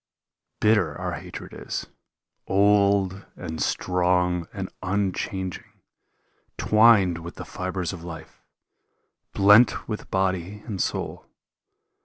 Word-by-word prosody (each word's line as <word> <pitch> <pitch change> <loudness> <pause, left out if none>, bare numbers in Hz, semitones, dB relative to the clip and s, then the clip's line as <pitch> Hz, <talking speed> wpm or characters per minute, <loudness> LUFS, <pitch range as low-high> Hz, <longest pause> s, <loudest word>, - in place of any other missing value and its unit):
Bitter 105 -4 +2
our - - -3
hatred - - -8
is, - - -5 0.6
old 100 -1 +3
and 80 -1 -6
strong 90 0 +1
and 95 -1 -6
unchanging. 95 -1 -3 0.8
Twined 105 -6 +5
with 85 +1 -9
the - - -8
fibres 90 0 -4
of 85 -3 -9
life, 85 -2 -10 0.9
blent 105 +2 +5
with 105 -2 -5
body 95 +1 -1
and 100 -5 -3
soul. - - -3
95 Hz, 100 wpm, -25 LUFS, 90-100 Hz, 0.9 s, Twined